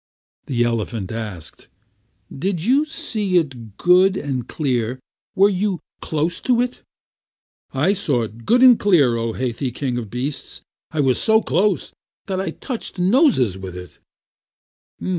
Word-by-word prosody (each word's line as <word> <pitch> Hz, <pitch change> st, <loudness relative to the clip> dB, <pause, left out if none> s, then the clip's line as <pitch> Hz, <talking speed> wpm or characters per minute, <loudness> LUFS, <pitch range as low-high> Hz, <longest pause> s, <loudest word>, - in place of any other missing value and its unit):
The 120 Hz, -3 st, +1 dB
elephant 115 Hz, -4 st, -2 dB
asked: 105 Hz, -8 st, -7 dB, 0.7 s
"Did 175 Hz, +3 st, -2 dB
you 275 Hz, +6 st, +3 dB
see 225 Hz, -, -1 dB
it 125 Hz, -, -3 dB
good 185 Hz, +2 st, +4 dB
and 135 Hz, -, -3 dB
clear? 125 Hz, -4 st, -1 dB, 0.4 s
Were 195 Hz, +1 st, +6 dB
you 195 Hz, -2 st, -1 dB, 0.2 s
close 160 Hz, +2 st, -1 dB
to 245 Hz, -2 st, +2 dB
it?" 245 Hz, 0 st, -1 dB, 0.9 s
"I 150 Hz, +9 st, +2 dB
saw 145 Hz, -, 0 dB
it 115 Hz, +1 st, -8 dB
good 245 Hz, -, +4 dB
and 250 Hz, -3 st, +8 dB
clear, 150 Hz, -, +4 dB
O 115 Hz, -1 st, -2 dB
Hathi, 125 Hz, +2 st, -2 dB
King 125 Hz, -1 st, -2 dB
of 110 Hz, -4 st, -7 dB
Beasts. 130 Hz, +4 st, -5 dB, 0.3 s
I 155 Hz, -2 st, -1 dB
was 130 Hz, -3 st, +2 dB
so 220 Hz, -1 st, +4 dB
close 185 Hz, +7 st, 0 dB, 0.3 s
that 190 Hz, -1 st, -2 dB
I 195 Hz, -, -2 dB
touched 245 Hz, -6 st, -6 dB
noses 180 Hz, -, +3 dB
with 95 Hz, -2 st, -7 dB
it." 90 Hz, -1 st, -11 dB
145 Hz, 140 wpm, -21 LUFS, 120-195 Hz, 0.9 s, and